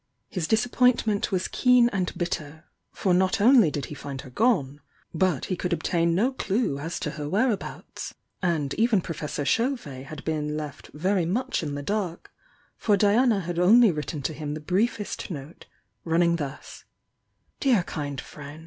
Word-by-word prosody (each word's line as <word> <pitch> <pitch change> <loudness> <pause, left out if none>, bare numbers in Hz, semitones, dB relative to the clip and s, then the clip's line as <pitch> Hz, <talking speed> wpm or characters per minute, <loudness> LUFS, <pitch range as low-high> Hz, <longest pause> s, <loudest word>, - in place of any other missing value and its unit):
His 175 -5 -2
disappointment 225 -1 +2
was 185 -1 0
keen 250 -2 +4
and 190 -4 -1
bitter, 160 -3 -4 0.3
for 185 - 0
not 185 +3 +2
only 230 - +6
did 145 -3 -3
he - - -8
find 140 -2 -6
her 135 -2 -12
gone, 145 - +1 0.3
but 175 -4 +1
he 185 - -2
could 180 0 -2
obtain 170 0 +1
no 235 +9 +2
clue 210 - -1
as 165 +4 -4
to 150 - -2
her 150 -1 -5
whereabouts. 215 +3 -2 0.3
And 160 -6 0
even 225 -4 +3
Professor 150 -4 -4
Chauvet 145 - -1
had 155 -2 -9
been 150 -1 -1
left 150 -3 -7
very 180 +2 +1
much 230 +9 -1
in 155 - -3
tiie 145 0 -5
dark, 200 -5 -3 0.5
for 205 -2 +3
Diana 210 +2 +3
had 175 0 -3
only 220 +4 +6
written 150 -1 -4
him 150 0 -3
the - - -5
briefest 205 +6 -1
note, 150 -1 -8 0.4
running 170 +1 +2
thus; 145 -3 -7 0.8
"Dear 245 -9 +3
Kind 145 -5 -4
Friend! 150 +1 -10
175 Hz, 160 wpm, -26 LUFS, 150-210 Hz, 0.8 s, only